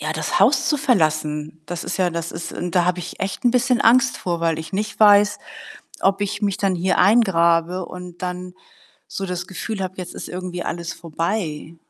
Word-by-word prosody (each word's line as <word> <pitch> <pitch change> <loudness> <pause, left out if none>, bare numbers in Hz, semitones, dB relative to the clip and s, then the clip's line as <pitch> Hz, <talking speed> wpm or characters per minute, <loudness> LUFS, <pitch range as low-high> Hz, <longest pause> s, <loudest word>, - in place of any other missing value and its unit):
ja, 155 +1 -2
das 160 +4 -1
Haus 260 +7 +4
zu 300 - +3
verlassen. 155 - 0
Das 175 +1 -5
ist - - -3
ja 180 -2 +2
das 170 0 -4
ist 165 0 -6
und 175 +1 -4
da 175 -1 +4
habe 180 0 +1
ich 175 - -7
echt 195 +5 -3
'n 245 - +5
bisschen 250 0 +2
Angst 255 +3 +4
vor, 170 -2 -3
weil 165 -1 +1
ich 160 - -8
nicht 210 +3 -3
weiß, 205 -1 +6 0.6
ob 195 +1 +2
ich 205 +1 -2
mich 200 -2 +1
dann 195 -2 0
hier 185 +2 0
eingrabe 180 -4 +3
und 180 0 -10
dann 180 0 -5 0.5
so 195 - -5
das 180 -1 -4
Gefühl 200 +2 -5
habe, 185 -1 -4
jetzt 180 -1 -6
ist - - -7
irgendwie 180 -1 -5
alles 170 -1 -4
vorbei. 165 -1 -3
180 Hz, 200 wpm, -21 LUFS, 170-200 Hz, 0.6 s, weiß